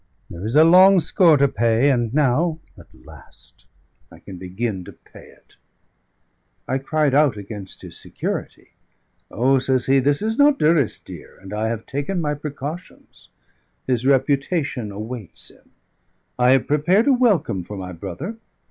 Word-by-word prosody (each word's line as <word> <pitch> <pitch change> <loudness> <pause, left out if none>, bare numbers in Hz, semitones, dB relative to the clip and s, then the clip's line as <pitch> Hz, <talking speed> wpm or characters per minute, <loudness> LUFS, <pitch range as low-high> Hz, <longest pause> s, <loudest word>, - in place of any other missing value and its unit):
There 85 +2 -8
is 110 +5 -3
a 155 - +7
long 185 +3 +7
score 165 0 +3
to 140 0 +3
pay, 115 +3 +2
and 120 -4 0
now 150 +4 +1 0.2
at - - -16 0.2
last - - -17 0.4
I - - -14
can 95 - -11
begin 95 +2 -4
to - - -11
pay - - -17
it." - - -23 1.1
I 130 - -1
cried 150 +1 0
out 145 -5 +3
against 100 -1 -9
his - - -9
security. - - -6 0.6
"O!" 130 +4 +2
says 130 -1 0
he, 135 0 +3
"this 145 +6 0
is 220 +3 -2
not 285 0 +5
Durrisdeer, 150 -6 -1
and 95 +1 -11
I 110 +1 -1
have 115 -1 -4
taken 145 +7 -3
my 150 -3 -1
precautions. 150 +3 -9 0.6
His 130 0 -1
reputation 140 - 0
awaits 110 0 -8
him; - - -25 0.7
I 125 0 +4
have 135 - +2
prepared 175 +9 +2
a 280 - +4
welcome 220 - +1
for 100 +4 -9
my 90 -1 -7
brother. 100 - -7
135 Hz, 155 wpm, -21 LUFS, 110-155 Hz, 1.1 s, a